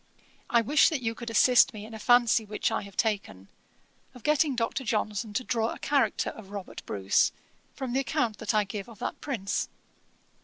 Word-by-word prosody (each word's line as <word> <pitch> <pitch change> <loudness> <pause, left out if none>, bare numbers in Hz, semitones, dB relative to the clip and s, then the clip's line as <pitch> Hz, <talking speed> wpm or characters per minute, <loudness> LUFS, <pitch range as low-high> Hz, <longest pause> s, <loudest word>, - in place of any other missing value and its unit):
I 235 - +4
wish 285 +7 +4
that 290 -6 -3
you 225 0 0
could 235 0 -7
assist 240 +1 +5
me 210 0 -7
in 225 - -11
a 220 - -7
fancy 240 -1 +4
which 210 +1 -2
I 225 - 0
have 200 -1 -12
taken, 145 - -2 0.7
of 250 - -13
getting 300 -2 +2
Dr. 240 +3 -1
Johnson 215 -1 -1
to 255 - 0
draw 230 -2 0
a - - -6
character 275 -7 +1
of 210 -4 -12
Robert 200 -2 -7
Bruce, 100 -1 +2 0.4
from 260 -3 -4
the 265 - +2
account 255 -6 -1
that 220 0 -1
I 210 - +4
give 200 +1 -6
of 225 - -13
that 245 - -5
prince. 230 -7 -2
225 Hz, 195 wpm, -28 LUFS, 210-250 Hz, 0.7 s, assist